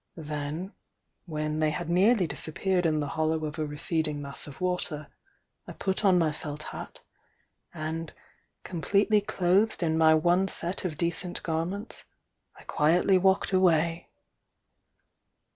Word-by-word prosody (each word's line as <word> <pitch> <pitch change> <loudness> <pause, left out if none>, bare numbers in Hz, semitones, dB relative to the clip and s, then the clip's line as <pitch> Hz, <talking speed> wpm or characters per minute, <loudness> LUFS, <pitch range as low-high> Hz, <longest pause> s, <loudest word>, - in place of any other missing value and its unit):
Then, 155 +4 -5 0.5
when 155 -1 -2
they 155 -1 +3
had 165 +2 -4
nearly 190 +4 +4
disappeared 170 +5 -1
in 155 -1 +1
the 145 - -3
hollow 160 +1 0
of 155 +1 -5
a 155 - -1
receding 150 0 -1
mass 140 0 -3
of 140 - -11
water, 180 -5 -2 0.6
I - - -7
put 190 +1 -2
on 190 -3 +5
my 165 -3 +2
felt 150 0 -6
hat, - - -8 0.7
and, 160 +1 -4 0.5
completely 200 +4 +2
clothed 195 +1 +1
in 160 -1 +1
my 160 0 +6
one 175 +4 +3
set 185 +1 -4
of 160 -5 -3
decent 175 +1 -2
gar 165 0 -1
ments, 200 +5 -7 0.5
I - - -15
quietly 175 +5 +3
walked 190 +1 +2
away." 170 -2 +2
165 Hz, 140 wpm, -28 LUFS, 155-185 Hz, 0.7 s, my